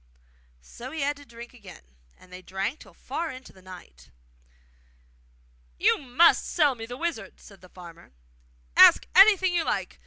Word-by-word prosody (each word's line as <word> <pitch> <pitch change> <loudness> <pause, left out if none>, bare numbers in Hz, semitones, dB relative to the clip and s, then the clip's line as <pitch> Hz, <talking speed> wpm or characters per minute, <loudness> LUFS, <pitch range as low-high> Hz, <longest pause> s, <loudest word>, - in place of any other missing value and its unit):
So 240 - -11
he 315 +2 -7
had 285 +1 -1
to 285 - -16
drink 235 +1 -13
again, 205 - -15 0.3
and 180 0 -20
they 180 - -10
drank 195 +9 -5
till - - -17
far 335 -1 -6
on 260 - -9
into 255 0 -15
the 190 - -20
night. 180 - -15 1.7
'You - - +1
MUST 290 +5 +2
sell 295 -5 0
me 225 -2 -10
the 245 +1 -9
wizard,' 270 - -6
said 200 -2 -18
the 185 - -17
farmer. 170 - -15 0.6
'Ask - - +6
anything 380 -1 +5
you 340 -2 0
like! - - -4
245 Hz, 165 wpm, -25 LUFS, 185-310 Hz, 1.7 s, Ask